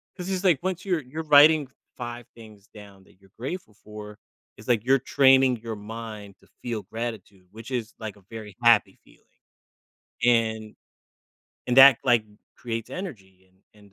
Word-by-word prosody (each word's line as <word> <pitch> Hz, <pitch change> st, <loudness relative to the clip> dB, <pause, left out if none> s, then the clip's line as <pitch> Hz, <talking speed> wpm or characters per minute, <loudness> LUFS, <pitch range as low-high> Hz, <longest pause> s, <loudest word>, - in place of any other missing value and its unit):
'cause 180 Hz, 0 st, -7 dB
it's 190 Hz, -1 st, -2 dB
like 175 Hz, -8 st, +3 dB
once 185 Hz, 0 st, -3 dB
you're 180 Hz, -5 st, 0 dB
you're 150 Hz, +5 st, -7 dB
writing 150 Hz, 0 st, +6 dB, 0.3 s
5 120 Hz, -1 st, -7 dB
things 110 Hz, -3 st, -15 dB
down 100 Hz, -2 st, -14 dB
that -, -, -24 dB
you're 95 Hz, -1 st, -24 dB
grateful 135 Hz, -, -7 dB
for, 105 Hz, 0 st, -10 dB, 0.4 s
it's 105 Hz, -, -15 dB
like 120 Hz, -4 st, +1 dB
you're 135 Hz, +1 st, +4 dB
training 130 Hz, -1 st, +4 dB
your 115 Hz, -1 st, -5 dB
mind 105 Hz, -1 st, -9 dB
to -, -, -25 dB
feel 115 Hz, -4 st, -4 dB
gratitude, 105 Hz, -3 st, -7 dB
which 115 Hz, +3 st, -11 dB
is 115 Hz, -3 st, -4 dB
like 110 Hz, -2 st, -7 dB
a 100 Hz, -, -21 dB
very 110 Hz, -3 st, -9 dB
happy 115 Hz, -2 st, +4 dB
feeling, -, -, -24 dB, 1.0 s
and 110 Hz, -2 st, +1 dB, 0.9 s
and 125 Hz, -, -1 dB
that, 135 Hz, -2 st, +9 dB
like, 120 Hz, -4 st, +3 dB, 0.3 s
creates 115 Hz, -2 st, -6 dB
energy 95 Hz, -, -9 dB, 0.2 s
and 105 Hz, -1 st, -20 dB
115 Hz, 160 wpm, -25 LUFS, 105-135 Hz, 1.0 s, that